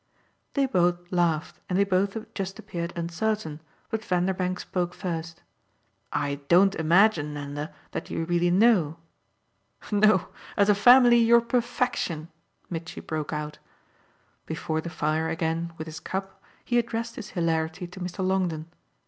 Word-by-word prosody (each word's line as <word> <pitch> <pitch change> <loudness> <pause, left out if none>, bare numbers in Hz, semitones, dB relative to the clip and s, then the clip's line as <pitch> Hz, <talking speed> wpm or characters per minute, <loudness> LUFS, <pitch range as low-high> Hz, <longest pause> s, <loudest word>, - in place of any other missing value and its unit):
They 280 -1 +3
both 175 -6 +1
laughed 170 -3 0
and 180 - +1
they 200 - +5
both 195 +2 +1 0.2
just 195 -1 -4
appeared 170 0 -5
uncertain, 170 -1 -2 0.3
but 220 -1 -2
Vanderbank 185 -1 0
spoke 180 -1 -2
first. 165 -3 -5 0.7
"I 140 -1 -1
don't 190 +4 +5
imagine, 160 -2 +3
Nanda, 145 +1 -5 0.2
that - - -5
you 165 - -2
really 175 +1 +2
know." 180 -5 +4 0.9
"No 205 -3 +4 0.3
as 200 0 +4
a - - +7
family, 245 +3 +7
you're 235 0 +6
perfection!" 235 - -1 0.4
Mitchy 165 -1 -6
broke 155 -2 -4
out. 150 -1 -4 0.9
Before 160 0 -2
the 170 - -6
fire 160 0 0
again, 165 +1 -1
with 160 - -5
his 155 -1 -7
cup, 195 0 -5 0.2
he 240 -1 +3
addressed 230 0 -3
his 210 -4 -7
hilarity 165 +1 0
to 180 +2 -11
Mr. 185 +1 -3
Longdon. 180 -5 0
175 Hz, 140 wpm, -26 LUFS, 160-200 Hz, 0.9 s, a